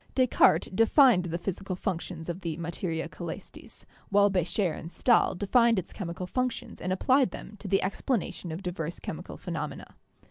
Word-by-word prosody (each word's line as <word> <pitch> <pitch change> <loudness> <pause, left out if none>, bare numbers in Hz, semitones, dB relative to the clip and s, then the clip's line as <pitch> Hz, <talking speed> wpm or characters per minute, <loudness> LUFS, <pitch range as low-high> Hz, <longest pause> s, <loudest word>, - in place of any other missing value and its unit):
Descartes 255 -2 +4
defined 225 - +5
the 170 -1 -2
physical 190 +1 -4
functions 175 -3 -4
of 175 +2 -4
the 165 -3 -3
'Materia 165 -1 -3
Caelestis,' - - -8 0.2
while 205 0 +5
Becher 180 0 +1
and 165 - -8
Stahl 240 -1 +3
defined 230 +4 +3
its 180 - -3
chemical 180 -2 -5
functions 255 +5 -3
and 185 - -2
applied 255 +6 +3
them 200 +3 -9
to 210 - -7
the 195 0 +2
explanation 190 -2 -2
of 165 +5 -6
diverse 175 -2 -4
chemical 160 +3 -7
phenomena. 150 -5 -5
185 Hz, 155 wpm, -28 LUFS, 170-205 Hz, 0.2 s, defined